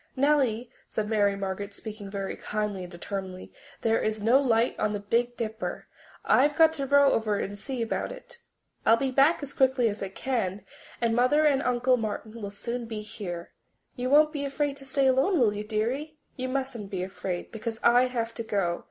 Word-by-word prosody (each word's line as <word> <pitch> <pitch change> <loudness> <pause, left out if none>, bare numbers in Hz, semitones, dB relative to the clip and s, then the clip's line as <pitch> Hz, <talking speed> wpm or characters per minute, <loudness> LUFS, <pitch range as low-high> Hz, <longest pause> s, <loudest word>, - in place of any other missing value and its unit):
"Nellie," 260 -4 +2 0.2
said 215 -1 -2
Mary 205 -2 +2
Margaret, 200 +1 -4
speaking 210 -2 -7
very 195 -1 -4
kindly 210 -2 -3
and 180 -1 -8
determinedly, 185 +1 -6 0.3
"there 225 0 +2
is 215 0 -1
no 235 +6 +4
light 235 -2 +2
on 215 0 +1
the 205 - -2
Big 240 +4 0
Dipper 220 -1 -4 0.4
and - - +5
I've 295 +1 +2
got 320 -1 +6
to 275 -3 -3
row 280 0 +5
over 215 -2 +1
and 200 +1 -3
see 245 +4 -4
about 225 - -2
it. - - -11 0.4
I'll 225 - +5
be 265 +2 -1
back 285 +4 +4
as 285 - -5
quickly 260 -2 +3
as 205 - -6
I 195 - -3
can, 205 -3 -2 0.3
and 230 -1 +1
Mother 255 +6 +4
and 280 -3 +4
Uncle 250 0 +2
Martin 220 0 -5
will 200 - -4
soon 235 +4 -5
be 215 -2 -5
here. 175 -5 -7 0.4
You 250 0 -2
won't 300 +2 +5
be 290 -2 -3
afraid 280 0 -1
to 275 - -11
stay 270 +1 +1
alone, 265 +8 +3
will 220 -5 +4
you, 210 0 -4
dearie? 245 +9 -2 0.2
You 255 0 -3
mustn't 255 -6 -3
be 185 -3 -3
afraid, 185 -1 -5
because 225 0 -5
I 245 +2 +5
have 230 -2 -3
to 230 - -4
go. 195 -6 -1
230 Hz, 200 wpm, -27 LUFS, 205-265 Hz, 0.4 s, got